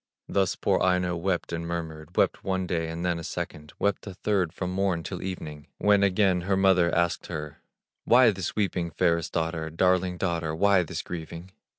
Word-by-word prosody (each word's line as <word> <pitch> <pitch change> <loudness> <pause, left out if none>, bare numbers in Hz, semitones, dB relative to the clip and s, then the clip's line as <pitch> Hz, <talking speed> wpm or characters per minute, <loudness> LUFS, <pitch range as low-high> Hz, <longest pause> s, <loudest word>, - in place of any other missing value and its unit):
Thus 95 -2 +1
poor - - +1
Aino 90 -1 +2
wept 90 0 -2
and 85 0 -2
murmured, 80 -2 -6
Wept - - +2
one 95 -1 -1
day, 85 -2 -1
and 85 +2 -4
then 85 -2 0
a - - -7
second, 75 -1 -6
Wept 100 +1 -1
a 95 - -7
third 95 -4 0
from 90 +1 -4
morn 95 -3 0
till 90 0 -5
even, 75 -6 -6
When 105 -1 +4
again 95 -2 +3
her 95 +2 0
mother 95 -3 +4
asked 85 0 0
her: 75 -1 -6 0.4
"Why 120 -1 +6
this 95 -3 -4
weeping, 90 -4 0
fairest 85 0 +1
daughter, 80 -1 -2
Darling 90 +2 +1
daughter, 85 -3 -1
why 100 +2 +4
this 85 - -4
grieving?" 85 +1 -7
90 Hz, 185 wpm, -27 LUFS, 85-95 Hz, 0.4 s, Why